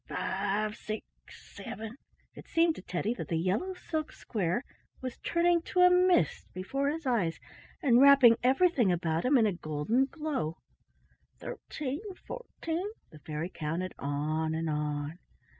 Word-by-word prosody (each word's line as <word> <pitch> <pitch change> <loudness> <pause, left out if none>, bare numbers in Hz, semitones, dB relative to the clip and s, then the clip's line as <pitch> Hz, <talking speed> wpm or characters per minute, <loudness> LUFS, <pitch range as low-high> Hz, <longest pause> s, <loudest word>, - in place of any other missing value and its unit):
"Five—six—seven" 215 +2 -4 0.4
—it - - -12
seemed 330 0 +3
to - - -10
Teddy 190 +5 -2
that - - -6
the 170 -5 0
yellow 200 - 0
silk 310 -3 -3
square 195 +1 -2 0.4
was 255 -1 -6
turning 340 0 +2
to 360 +2 0
a 360 0 +8
mist 360 - +3
before 275 +10 -1
his 320 +1 -4
eyes 205 -11 +1 0.4
and 250 -3 +5
wrapping 275 -4 +8
everything 260 - +4
about 165 -2 0
him 270 +2 +5
in 230 - +4
a 205 - +2
golden 160 - 0
glow. 275 - -3 0.8
"Thirteen—fourteen" 355 - -5 0.2
—the 155 - -13
fairy 155 +4 -4
counted 165 +4 -3
on 155 +3 -1
and 160 -1 -1
on. 150 +2 -2
220 Hz, 130 wpm, -30 LUFS, -, 0.8 s, a